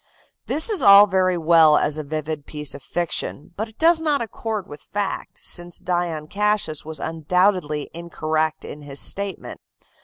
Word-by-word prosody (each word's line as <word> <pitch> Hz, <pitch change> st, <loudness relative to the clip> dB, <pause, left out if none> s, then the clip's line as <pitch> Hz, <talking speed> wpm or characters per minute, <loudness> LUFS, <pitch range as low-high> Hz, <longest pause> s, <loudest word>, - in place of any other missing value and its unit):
This 315 Hz, -, +3 dB
is 410 Hz, -, +3 dB
all 200 Hz, +1 st, +9 dB
very 185 Hz, -2 st, +1 dB
well 160 Hz, -2 st, +5 dB
as 150 Hz, +1 st, 0 dB
a -, -, -4 dB
vivid 155 Hz, 0 st, -5 dB
piece 150 Hz, -2 st, -2 dB
of 140 Hz, -, -9 dB
fiction, 165 Hz, +1 st, -3 dB
but 220 Hz, +2 st, -4 dB
it 220 Hz, -, -22 dB
does 330 Hz, 0 st, +4 dB
not 300 Hz, -3 st, +1 dB
accord 220 Hz, -2 st, -4 dB
with 145 Hz, -, -11 dB
fact, 205 Hz, +1 st, -5 dB
since 175 Hz, -1 st, -4 dB
Dion 175 Hz, -3 st, -2 dB
Cassius 205 Hz, -4 st, -1 dB
was 160 Hz, 0 st, -6 dB
undoubtedly 165 Hz, -1 st, 0 dB
incorrect 160 Hz, -2 st, -2 dB
in 150 Hz, -, -9 dB
his 140 Hz, -1 st, -7 dB
statement. 200 Hz, -1 st, -3 dB
170 Hz, 160 wpm, -22 LUFS, 155-200 Hz, -, all